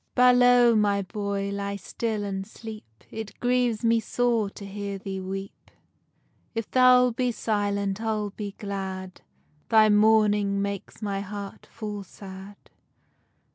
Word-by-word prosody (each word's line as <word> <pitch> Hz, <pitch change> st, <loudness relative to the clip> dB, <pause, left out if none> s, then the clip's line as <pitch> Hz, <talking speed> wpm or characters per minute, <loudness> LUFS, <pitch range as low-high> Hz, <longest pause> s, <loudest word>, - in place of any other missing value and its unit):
BALOW, 245 Hz, -1 st, +6 dB
my 200 Hz, -1 st, +2 dB
boy, 200 Hz, 0 st, -3 dB
ly 200 Hz, 0 st, -3 dB
still 215 Hz, +1 st, -3 dB
and 195 Hz, -1 st, -4 dB
sleep, 215 Hz, -, -11 dB
It 220 Hz, -1 st, -7 dB
grieves 245 Hz, -2 st, +1 dB
me 230 Hz, 0 st, +4 dB
sore 230 Hz, -2 st, 0 dB
to 200 Hz, -, -10 dB
hear 200 Hz, 0 st, -5 dB
thee 190 Hz, 0 st, -5 dB
weep, 195 Hz, +1 st, -7 dB, 0.9 s
If 225 Hz, -1 st, -2 dB
thou'lt 250 Hz, -1 st, +5 dB
be 250 Hz, 0 st, +1 dB
silent, 205 Hz, -2 st, -1 dB
I'll 215 Hz, -2 st, -1 dB
be 205 Hz, 0 st, -6 dB
glad, 190 Hz, -2 st, -5 dB, 0.5 s
Thy 220 Hz, -1 st, +6 dB
mourning 210 Hz, -1 st, +4 dB
makes 200 Hz, +2 st, -4 dB
my 200 Hz, -1 st, -1 dB
heart 200 Hz, 0 st, -7 dB
full 210 Hz, -2 st, -6 dB
sad. 195 Hz, +1 st, -11 dB
205 Hz, 130 wpm, -26 LUFS, 200-225 Hz, 0.9 s, BALOW